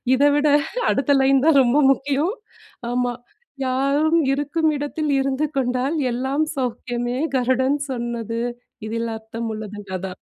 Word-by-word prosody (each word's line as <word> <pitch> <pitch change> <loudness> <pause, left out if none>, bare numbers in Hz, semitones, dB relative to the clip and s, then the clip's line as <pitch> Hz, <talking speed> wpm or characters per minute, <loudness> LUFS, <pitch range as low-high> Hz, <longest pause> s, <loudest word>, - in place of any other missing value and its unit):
இதை 285 +2 +4
விட 295 +1 +2 0.4
அடுத்த 275 +1 +1
லைன் 270 0 +4
தான் 305 -4 +6
ரொம்ப 245 +3 +2
முக்கியம். 280 +7 0 0.6
ஆமா. 245 0 0 0.5
"யாரும் 280 +5 +2
இருக்கும் 295 +3 0
இடத்தில் 290 +1 -2
இருந்து 270 +2 0
கொண்டால் 255 +3 0 0.2
எல்லாம் 265 +5 0
சௌக்கியமே 245 -1 -2 0.2
கருடன் 260 +2 +2
சொன்னது. 235 -2 -3 0.5
இதில 230 +1 -2
அர்த்தம் 225 +1 -6
உள்ளது" 210 -1 -7 0.2
அதான். 185 0 -7
260 Hz, 120 wpm, -22 LUFS, 240-285 Hz, 0.6 s, தான்